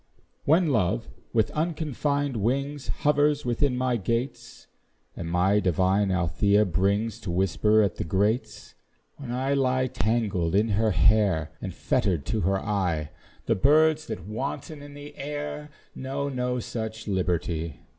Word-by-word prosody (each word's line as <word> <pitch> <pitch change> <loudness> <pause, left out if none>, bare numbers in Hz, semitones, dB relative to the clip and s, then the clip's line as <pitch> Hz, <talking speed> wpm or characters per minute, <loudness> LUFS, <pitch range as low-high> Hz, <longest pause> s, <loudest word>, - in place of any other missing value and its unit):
When 160 +3 +4
love, 90 - 0 0.2
with 110 -2 +1
unconfined 150 -3 -1
wings, 135 +6 -1
Hovers 150 0 +1
within 125 +2 +1
my 125 -1 +1
gates, 115 +6 -3 0.5
And 85 - -5
my 95 +4 +3
divine 95 +2 +2
Althea 95 +4 +2
brings 100 +5 0
To 105 - -7
whisper 100 +4 +3
at 100 - -1
the - - -2
grates; 105 +5 -1 0.4
When 135 -4 -8
I 130 +3 0
lie 130 -1 +2
tangled 105 -7 0
in 105 +3 +3
her 110 +2 +2
hair, 95 -3 +3
And - - -4
fetter'd 85 -8 0
to 110 +6 -1
her 95 +2 +1
eye 90 -8 -1 0.3
The - - +2
birds 155 +7 +3
that - - -6
wanton 140 +7 -5
in 145 0 -11
the 145 0 -10
air, 150 +1 -5 0.2
Know 135 +2 -3
no 125 -1 -1
such 110 -1 -5
liberty. 85 -4 -2
110 Hz, 140 wpm, -26 LUFS, 95-140 Hz, 0.5 s, When